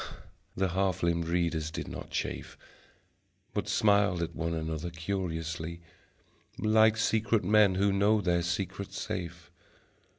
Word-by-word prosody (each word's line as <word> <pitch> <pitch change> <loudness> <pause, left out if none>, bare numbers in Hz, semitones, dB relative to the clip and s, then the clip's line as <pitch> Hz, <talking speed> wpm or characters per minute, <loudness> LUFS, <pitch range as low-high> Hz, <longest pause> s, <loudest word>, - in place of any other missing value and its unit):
The 95 0 +1
half 95 0 0
limbed 85 -1 +1
readers 85 -2 0
did - - -5
not - - -7
chafe - - -4 1.0
But 105 0 -2
smiled 100 -4 +3
at 85 - -5
one 85 0 -2
another 80 +1 -3
curiously 85 -2 -4 0.8
Like 110 0 +4
secret 110 -1 +1
men 105 0 +5
who 100 +1 +2
know 105 +2 +3
their 90 -3 +1
secret 95 +3 -3
safe. 85 -1 -5
90 Hz, 125 wpm, -30 LUFS, 85-100 Hz, 1.0 s, men